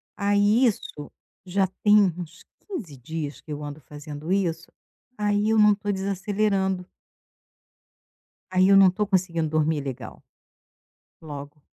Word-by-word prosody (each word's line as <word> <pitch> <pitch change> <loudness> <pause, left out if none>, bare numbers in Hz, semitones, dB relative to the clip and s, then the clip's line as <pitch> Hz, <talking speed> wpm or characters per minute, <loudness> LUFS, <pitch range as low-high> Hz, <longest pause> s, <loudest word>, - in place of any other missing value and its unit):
Aí, 205 +4 +3
isso 150 -9 -3 0.3
já 190 +1 +1 0.2
tem 205 -4 +5
uns 175 +1 -9 0.2
15 210 - -6
dias 150 +2 -6
que 155 - -11
eu 150 0 -5
ando 145 +1 -7
fazendo 150 +4 -8
isso. 170 -4 -1 0.5
Aí, 205 +1 +1
eu 220 - +3
não 210 -1 +6
tô 205 0 -3
desacelerando. 195 -1 -1 1.7
Aí, 185 +1 +4
eu 200 - +7
não 195 -2 +7
tô 210 +3 -1
conseguindo 175 -5 0
dormir 155 -1 +1
legal. 135 -3 -7 1.0
Logo. 145 -1 -9
185 Hz, 130 wpm, -25 LUFS, 155-205 Hz, 1.7 s, eu